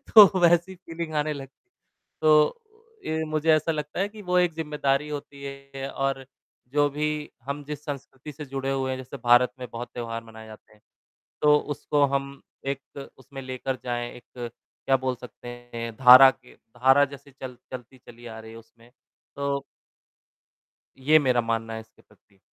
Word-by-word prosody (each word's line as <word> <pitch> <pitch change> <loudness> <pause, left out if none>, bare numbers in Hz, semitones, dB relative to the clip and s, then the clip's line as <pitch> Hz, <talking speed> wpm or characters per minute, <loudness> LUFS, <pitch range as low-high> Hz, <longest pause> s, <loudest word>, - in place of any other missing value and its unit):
तो 200 -3 +10
वैसी 175 +2 +4
फीलिंग 165 -2 -7
आने 150 +1 0
लगती 135 -2 -10
है, - - -70 0.5
तो 155 - +5 0.5
ये 160 0 -1
मुझे 155 +1 +1
ऐसा 155 +2 +2
लगता 150 +1 -4
है 200 +2 +1
कि 215 0 -11
वो 180 -1 0
एक 175 -2 +2
ज़िम्मेदारी 150 -2 -1
होती 140 -1 -7
है 140 0 -7
और 135 -1 -2 0.5
जो 145 0 +3
भी 150 +2 -1 0.4
हम 140 +1 -4
जिस 150 +1 -7
संस्कृति 140 0 -7
से 150 +1 -8
जुड़े 135 0 -3
हुए 130 -1 -1
हैं 130 - -2
जैसे 130 +2 -8
भारत 120 +1 +5
में 125 - -6
बहुत 120 +1 -6
त्योहार 115 -1 -5
मनाए 110 -1 -12
जाते 110 0 -14
हैं, 105 - -25 0.6
तो 150 0 +6
उसको 145 0 0
हम 140 0 -1 0.3
एक 140 0 -6
उसमें 135 +1 -10
लेकर 130 0 -3
जाएँ, 120 -1 -3
एक 120 -1 -9 0.3
क्या 135 - +4
बोल 130 0 -2
सकते 125 0 -11 0.3
हैं 115 0 -4
धारा 130 +1 +10
के 130 -2 -20
धारा 130 +5 +3
जैसे 140 0 -12
चल 130 -2 -9
चलती 130 0 -9
चली 120 0 -15
आ 110 -1 -8
रही 110 0 -11
है 115 - -10
उसमें, 115 +1 -18 0.4
तो 140 0 -1 1.3
ये 145 +4 +5
मेरा 130 -5 +2
मानना 115 -1 -2
है, 110 - -5
इसके 110 0 -19
प्रति। 100 -1 -28
135 Hz, 175 wpm, -26 LUFS, 125-150 Hz, 1.3 s, तो